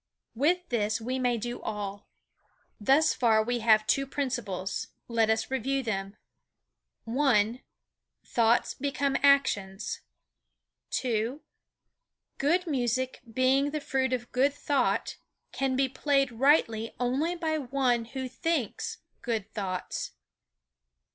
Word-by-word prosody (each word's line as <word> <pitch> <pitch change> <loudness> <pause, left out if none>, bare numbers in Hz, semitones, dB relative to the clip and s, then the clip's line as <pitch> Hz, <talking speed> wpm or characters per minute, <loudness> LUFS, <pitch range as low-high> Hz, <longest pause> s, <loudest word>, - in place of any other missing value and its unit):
With 345 +9 +1
this 215 -2 0
we 255 +3 -3
may 245 -2 +1
do 240 +2 -5
all. 205 -2 -5 0.7
Thus 275 +9 +4
far 220 -3 +3
we 245 +2 -1
have 215 -1 +4
two 275 +4 +1
principles. 240 -10 -3 0.2
Let 230 -2 +2
us 220 +3 0
review 265 +2 0
them: 195 -3 -3 0.9
I. 240 -2 +2 0.6
Thoughts 235 0 +2
become 280 0 -1
actions. 210 -9 +2 1.1
II. 235 +4 -1 1.0
Good 340 +6 +2
music 255 -3 -1
being 260 +4 +3
the 305 +1 -2
fruit 265 -2 0
of 245 -1 -3
good 275 +3 +2
thought 255 -8 0 0.3
can 265 -1 -1
be 270 +1 +2
played 275 0 +1
rightly 230 -3 +2
only 270 +8 0
by 320 -2 -1
one 250 -3 +1
who 260 +2 -5
thinks 295 -1 -2 0.2
good 220 -3 -3
thoughts. 185 -3 -4
250 Hz, 115 wpm, -28 LUFS, 225-275 Hz, 1.1 s, Thus